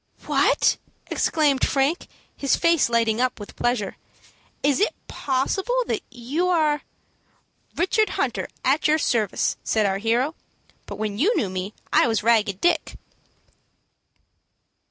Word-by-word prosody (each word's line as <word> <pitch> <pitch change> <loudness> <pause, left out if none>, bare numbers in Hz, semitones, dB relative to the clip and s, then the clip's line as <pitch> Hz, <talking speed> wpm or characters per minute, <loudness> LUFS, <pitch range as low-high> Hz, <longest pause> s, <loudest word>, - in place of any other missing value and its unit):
"What!" - - +2 0.3
exclaimed 290 -4 +1
Frank, 280 +6 +1 0.3
his 275 - +1
face 335 -6 +3
lighting 230 -1 +1
up 255 -2 0
with 205 - -10
pleasure, 240 -5 -1 0.7
"is 285 -1 +2
it 415 - +1
possible 385 - -1
that - - -2
you 260 +9 -2
are 310 -4 +2 0.5
" - - -40
"Richard 425 +5 +2
Hunter, - - -1 0.2
at 300 - +3
your 305 +1 +4
service," 225 - 0
said 215 -1 +1
our 195 0 0
hero; 240 +7 +1 0.5
"but - - -6
when 210 -1 -3
you 415 - +3
knew 195 -5 -1
me 185 +2 -5 0.2
I - - +5
was 225 -2 0
Ragged 210 -4 +2
Dick." 350 0 +1
255 Hz, 135 wpm, -23 LUFS, 220-315 Hz, 0.7 s, I